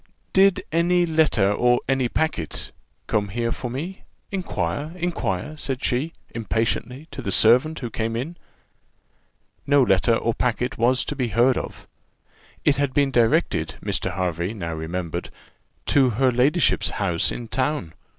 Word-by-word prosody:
"Did 195 -1 +4
any 175 +2 +3
letter, 155 - +2 0.3
any 135 -2 +1
packet, 135 - -2 0.3
come 105 -1 0
here 115 +3 -1
for 125 - -4
me? 160 +10 -5 0.3
Inquire, 170 -5 -3
inquire," 155 - -2
said 135 -3 -4
she, 140 +7 0 0.2
impatiently, 115 +5 -2
to - - -6
the 100 - -3
servant 125 +11 +4
who 120 -3 -5
came 115 +1 -2
in. 140 +9 -4 1.3
No 145 -1 +5
letter 115 +2 +3
or 115 0 0
packet 125 +1 -1
was 125 +3 +3
to 145 - -4
be 130 -3 -1
heard 120 +4 +3
of. - - -6 0.8
It 145 -3 +4
had 140 -2 -1
been 140 -1 +3
directed, 115 -3 +2
Mr. 90 -1 -2
Hervey 90 +2 -2
now 85 -5 -4
remembered, 80 +1 -4 0.6
to 135 -3 +5
her 130 +3 +2
ladyship's 135 +8 +2
house 90 -4 +1
in 120 - -6
town. 130 - -1
125 Hz, 140 wpm, -23 LUFS, 110-145 Hz, 1.3 s, No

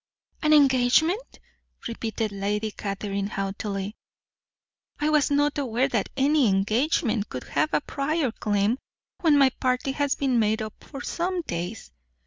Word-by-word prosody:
"An 305 - +2
engagement!" 295 - +3 0.5
repeated 225 -2 -3
Lady 205 +2 -2
Catherine 200 0 -3
haughtily. 195 +1 -4 1.0
"I 300 +1 +1
was 300 -2 +3
not 290 0 +2
aware 255 -1 +1
that 220 -6 -1
any 280 -1 +4
engagement 215 - +1
could 125 - -5
have 310 - 0
a - - +2
prior 280 -1 -1
claim, 210 +3 0 0.4
when 315 -5 +4
my 270 -2 +5
party 255 +1 0
has 285 0 0
been 260 -4 +1
made 220 0 +2
up 215 -1 -7
for 275 -2 -8
some 360 +1 -2
days. 175 - -5
245 Hz, 135 wpm, -25 LUFS, 210-290 Hz, 1.0 s, my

